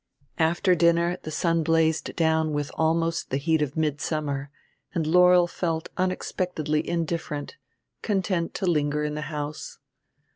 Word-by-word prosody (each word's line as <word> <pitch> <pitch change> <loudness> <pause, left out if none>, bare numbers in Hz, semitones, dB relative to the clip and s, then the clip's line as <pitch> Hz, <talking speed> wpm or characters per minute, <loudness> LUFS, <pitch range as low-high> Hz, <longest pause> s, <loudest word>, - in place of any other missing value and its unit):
After 170 +3 +3
dinner 170 +1 +2
the - - -7
sun 165 +1 +1
blazed 160 0 +1
down 160 -2 +2
with 145 -1 -2
almost 165 +1 0
the 135 - 0
heat 160 +2 +1
of 150 +1 -2
midsummer, 145 -2 -1 0.5
and 165 -3 0
Laurel 180 +2 +6
felt 165 -2 -3
unexpectedly 180 -4 -1
indifferent, 165 - -3 0.5
content 190 -4 -1
to - - -2
linger 150 -3 +1
in 150 0 -2
the 150 - -4
house. 150 0 -5
160 Hz, 135 wpm, -25 LUFS, 150-170 Hz, 0.5 s, Laurel